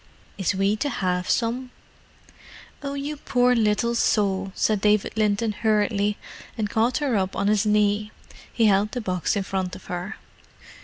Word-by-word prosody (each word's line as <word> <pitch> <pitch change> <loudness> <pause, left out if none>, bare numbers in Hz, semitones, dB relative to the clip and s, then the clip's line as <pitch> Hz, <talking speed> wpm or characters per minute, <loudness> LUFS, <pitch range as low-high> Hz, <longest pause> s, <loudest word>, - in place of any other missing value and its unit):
"Is 190 -1 -1
we 195 +2 +2
to 290 +6 -1
have 180 -6 -1
some?" 245 +2 0 1.1
"Oh, 280 -1 -4
you 285 +2 -4
poor 250 -2 +2
little 230 +1 +1
soul!" 195 -4 +1
said 215 -2 +1
David 210 -1 +2
Linton 215 +1 +1
hurriedly, 210 -1 +1 0.4
and 210 -2 -2
caught 230 +2 +2
her 285 -6 0
up 190 -1 -1
on 200 - 0
his 210 0 +2
knee. 210 0 +2 0.4
He 230 - +2
held 205 +1 +3
the 250 - -2
box 185 -1 -1
in 200 - 0
front 190 -1 -3
of - - -12
her. 180 +4 -5
210 Hz, 160 wpm, -24 LUFS, 195-230 Hz, 1.1 s, held